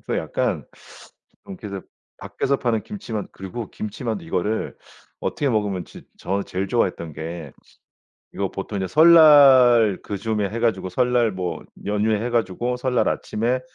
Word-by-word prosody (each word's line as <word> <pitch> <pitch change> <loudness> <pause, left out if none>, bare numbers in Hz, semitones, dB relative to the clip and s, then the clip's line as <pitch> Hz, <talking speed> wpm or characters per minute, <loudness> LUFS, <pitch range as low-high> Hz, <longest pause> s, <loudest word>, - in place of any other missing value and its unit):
그래서 - - -1
약간 - - -2 0.8
좀 195 -2 -9
이렇게 100 -3 -7 0.3
밖에서 140 +1 -2
파는 115 -4 -1
김치만 115 - -6
그리고 95 +4 -7
김치만두 110 -2 -5
이거를 95 +6 -2 0.5
어떻게 140 - -1
먹으면 100 -5 -1
지 - - -13
저는 100 +1 -2
제일 95 +1 -3
좋아했던 90 -8 -1
게 80 -1 -7 0.8
이거 100 -1 -2
보통 100 +1 -6
이제 95 - -2
설날 140 - +7
그 100 - -5
즈음에 105 -2 -1
해 115 +2 -4
가지고 105 -6 0
설날 120 +2 +2
뭐 90 -1 -4 0.2
연휴에 105 +1 0
해 120 - -2
가지고 120 +2 -1
설날 125 0 0
아침에 120 +4 -1
110 Hz, 325 characters per minute, -22 LUFS, 95-125 Hz, 0.8 s, 설날